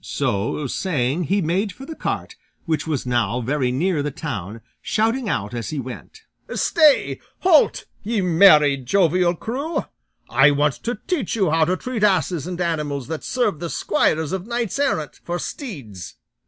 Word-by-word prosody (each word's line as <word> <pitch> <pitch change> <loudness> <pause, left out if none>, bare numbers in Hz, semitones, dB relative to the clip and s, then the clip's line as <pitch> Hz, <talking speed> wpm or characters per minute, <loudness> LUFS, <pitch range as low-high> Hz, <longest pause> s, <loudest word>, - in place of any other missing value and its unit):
So 105 +9 -1
saying, 150 +1 -1
he 195 +4 +1
made 190 +6 0
for 265 +8 -11
the 320 - -7
cart, - - -4 0.3
which 160 -1 -1
was 150 -5 -2
now 120 -2 0
very 130 +1 0
near 160 +4 0
the 145 - -1
town, 115 - -6 0.2
shouting 225 +2 0
out 105 - -2
as 120 -1 -4
he 155 - -4
went, 130 - -9 0.3
"Stay! 305 -4 +3 0.2
halt! 355 -5 +4 0.2
ye 220 +1 -1
merry, 160 -6 +6
jovial 175 +5 +2
crew! 275 - -3 0.4
I 135 +2 +5
want 145 0 +2
to 235 -1 -1
teach 325 - -1
you 190 -8 +1
how 160 0 +3
to 185 +3 0
treat 250 -2 -4
asses 185 -5 +2
and 180 -1 -5
animals 150 -6 -2
that 160 -1 -4
serve 215 - 0
the 170 0 -4
squires 160 -6 0
of 190 +1 -4
knights 235 +1 -2
errant 155 - -1
for 175 0 -3
steeds." 135 - -7
170 Hz, 165 wpm, -22 LUFS, 140-210 Hz, 0.4 s, merry